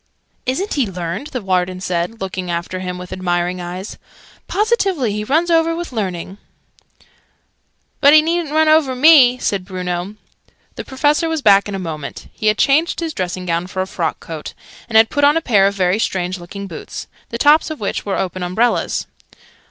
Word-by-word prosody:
"Isn't 360 +11 -1
he 270 -6 +1
learned?" 180 - -5
the 250 -7 -5
Warden 185 -1 0
said, 180 +4 -2
looking 185 -1 -4
after 175 +2 -3
him 180 -1 -5
with 180 0 -8
admiring 180 0 -1
eyes. 180 +3 -7 0.5
"Positively 390 - +1
he 210 +1 -3
runs 320 +9 +1
over 330 0 +3
with 345 -2 -5
learning!" 190 -3 -4 1.6
"But 285 +1 +7
he 305 - +7
needn't 335 -2 -1
run 315 0 +4
over 310 -4 +4
me!" 255 -3 +7
said 200 -6 -1
Bruno. 180 +1 -4 0.6
The - - -6
Professor 295 +5 +1
was 320 -3 -2
back 200 -1 +5
in 200 - -4
a - - -2
moment: 155 -6 -6
he 215 - -3
had 215 0 +3
changed 310 +5 +2
his 330 -2 -3
dressing 180 0 -4
gown 170 0 -1
for 185 0 -2
a - - -8
frock 165 -4 -2
coat, 160 -2 -8 0.3
and 220 - +3
had 225 0 +5
put 290 - 0
on 290 +2 +5
a - - +3
pair 210 -11 +3
of 200 - -2
very 185 +1 +1
strange 185 -3 -1
looking 200 +3 -8
boots, 170 -5 -8 0.2
the 235 - -4
tops 295 +5 +4
of 315 - -6
which 200 - -3
were 200 - -2
open 185 0 -3
umbrellas. 200 +7 0
200 Hz, 185 wpm, -18 LUFS, 180-290 Hz, 1.6 s, But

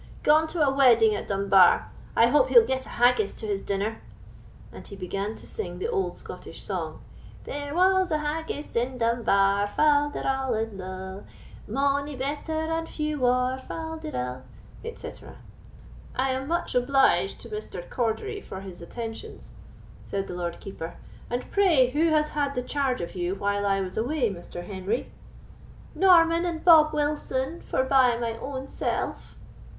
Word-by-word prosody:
"Gone 310 +2 +5
to 325 0 -3
a 270 - +2
wedding 235 -5 +5
at - - -5
Dunbar; 195 -2 +4 0.2
I 230 - +6
hope 295 - +3
he'll 470 -2 +7
get 260 0 -2
a - - -9
haggis 240 -4 +3
to - - -7
his 200 -2 -2
dinner"; 200 +3 -2 0.7
and - - -11
he 200 - -9
began 195 +3 -4
to - - -12
sing 440 - -6
the 455 - -3
old 405 -5 -1
Scottish - - -9
song: - - -4 0.4
"There 285 +1 -5
was 375 +1 +4
a 310 - +1
haggis 300 0 -4
in 250 +2 0
Dunbar, 205 -4 +2
Fal 290 +5 +3
de - - -5
ral, 265 -2 0
&c. 190 -3 -6 0.4
Mony 280 +1 0
better 285 +5 -4 0.2
and 325 0 -2
few 300 -1 -3
waur, 255 +1 +2
Fal 320 +4 -6
de 315 -1 -7
ral," 125 - -4 0.5
&c. - - -7 1.0
"I 260 +1 +1
am 260 +1 -3
much 340 +2 -1
obliged 250 -7 +3
to 235 - -10
Mr. 210 -4 -6
Cordery 260 - -2
for 190 - -8
his 185 -3 -10
attentions," 225 +5 -8 0.5
said 195 -1 -3
the - - -7
Lord 175 -1 -4
Keeper; 170 -4 -7 0.3
"and 245 +1 -4
pray 320 -11 +4
who 310 +5 +2
has 305 -1 +2
had 285 -1 -1
the 250 - -1
charge 270 -3 -1
of 170 - -5
you 180 +1 -2
while 205 0 -1
I 195 0 +2
was 185 -1 -5
away, 245 0 0
Mr. 175 0 -8
Henry?" 195 +4 -3 0.8
"Norman 335 -3 +5
and 335 -2 -4
Bob 315 -3 +8
Wilson, 295 0 -2
forbye 260 -2 +3
my 230 -1 -2
own 270 -1 -5
self." - - -4
255 Hz, 160 wpm, -26 LUFS, 200-300 Hz, 1.0 s, Bob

